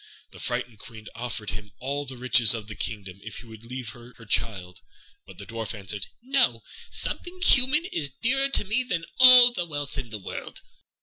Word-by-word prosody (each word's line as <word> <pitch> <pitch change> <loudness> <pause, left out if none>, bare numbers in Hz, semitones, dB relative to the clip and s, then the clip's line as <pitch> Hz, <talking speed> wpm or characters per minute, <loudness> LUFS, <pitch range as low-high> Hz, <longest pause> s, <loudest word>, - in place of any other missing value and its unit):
The - - -13
frightened 115 -4 -4
Queen 110 -1 -13
offered 115 -2 -5
him 105 0 -9
all 140 +3 -4
the 130 -1 -6
riches 125 -2 +5
of 110 -3 -7
the 110 - -7
kingdom 100 -2 -6
if 115 - -8
he - - -9
would 110 -1 -13
leave 125 -1 -7
her 120 +2 -13
her 115 - -14
child; 95 -5 -3 0.5
but - - -14
the - - -8
Dwarf 115 0 -5
answered, 100 0 -4 0.2
"No; 270 +1 +1 0.3
something 360 +1 -2
human 270 +3 +4
is 150 - -2
dearer 270 - 0
to 275 - +2
me 215 +6 0
than 180 -9 -3
all 250 -1 +10
the 180 - -2
wealth 145 -3 -4
of 125 -4 -7
the 110 - -6
world." 95 - -8
125 Hz, 195 wpm, -25 LUFS, -, 0.5 s, all